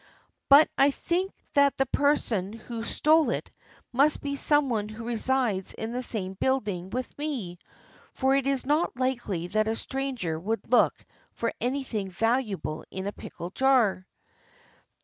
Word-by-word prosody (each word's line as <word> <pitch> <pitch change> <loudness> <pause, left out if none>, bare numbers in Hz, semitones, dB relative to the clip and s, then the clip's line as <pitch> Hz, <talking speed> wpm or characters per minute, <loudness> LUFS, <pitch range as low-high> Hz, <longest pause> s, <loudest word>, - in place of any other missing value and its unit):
"But 280 +3 +8
I 275 - +6
think 355 +6 -1 0.2
that 280 -1 +4
the 270 - +2
person 240 -9 +1
who 230 0 -7
stole 310 +6 +3
it - - -3 0.4
must 280 +4 +3
be 280 -1 -3
someone 270 -8 +2
who 220 +2 -8
resides 235 -4 0
in 220 +1 -4
the 250 +1 -2
same 200 -6 -2
build 260 +3 0
ing 180 -2 -4
with 255 +4 -4
me, 240 - -4 0.5
for 265 0 +2
it 275 -1 +1
is 275 -2 0
not 295 -1 +1
likely 240 -9 -1
that 215 +2 +1
a 220 - 0
stranger 255 -13 -3
would 225 +6 -3
look 250 - +5 0.4
for 230 - -2
anything 245 -5 -2
valuable 215 -5 -1
in 190 0 -5
a 200 - -2
pickle 175 +1 -8
jar." 235 -8 +2
245 Hz, 150 wpm, -27 LUFS, 205-275 Hz, 0.5 s, But